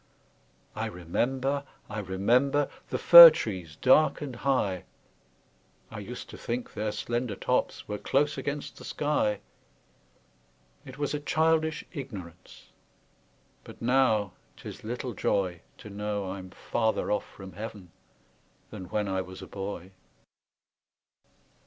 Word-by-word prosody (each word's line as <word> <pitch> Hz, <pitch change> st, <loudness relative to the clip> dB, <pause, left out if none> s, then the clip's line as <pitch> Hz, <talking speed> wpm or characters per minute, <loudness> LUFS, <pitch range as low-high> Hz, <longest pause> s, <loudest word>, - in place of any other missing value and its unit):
I -, -, -2 dB
remember, 130 Hz, +11 st, -1 dB, 0.2 s
I 105 Hz, -, -5 dB
remember, 120 Hz, +9 st, +1 dB, 0.2 s
The -, -, -1 dB
fir 170 Hz, -1 st, +12 dB
trees 95 Hz, -, -5 dB
dark 130 Hz, -, +4 dB
and 140 Hz, -4 st, -6 dB
high; 110 Hz, -9 st, 0 dB, 1.1 s
I -, -, -7 dB
used -, -, -8 dB
to -, -, -11 dB
think 120 Hz, +1 st, -4 dB
their 105 Hz, 0 st, -2 dB
slender 120 Hz, -1 st, -3 dB
tops -, -, -1 dB
Were 105 Hz, 0 st, -4 dB
close 145 Hz, +6 st, +1 dB
against 145 Hz, -1 st, -5 dB
the -, -, -11 dB
sky: 145 Hz, -9 st, -1 dB, 1.5 s
It 130 Hz, +1 st, -10 dB
was 145 Hz, 0 st, -2 dB
a 150 Hz, -, -1 dB
childish 160 Hz, +3 st, +1 dB
ignorance, 105 Hz, -, -9 dB, 0.9 s
But -, -, -13 dB
now 115 Hz, -5 st, +2 dB, 0.2 s
'tis -, -, -10 dB
little 120 Hz, +2 st, -4 dB
joy 95 Hz, -3 st, -1 dB, 0.2 s
To 105 Hz, -, -11 dB
know 105 Hz, -1 st, -3 dB
I'm 95 Hz, -1 st, -7 dB
farther 110 Hz, +4 st, -1 dB
off 105 Hz, -1 st, -1 dB
from 95 Hz, -1 st, -11 dB
Heav'n 105 Hz, -4 st, -8 dB, 0.8 s
Than 95 Hz, -3 st, -7 dB
when 105 Hz, +3 st, -2 dB
I 95 Hz, -1 st, -1 dB
was 95 Hz, 0 st, -9 dB
a -, -, -9 dB
boy. 95 Hz, -2 st, -6 dB
110 Hz, 125 wpm, -28 LUFS, 95-135 Hz, 1.5 s, fir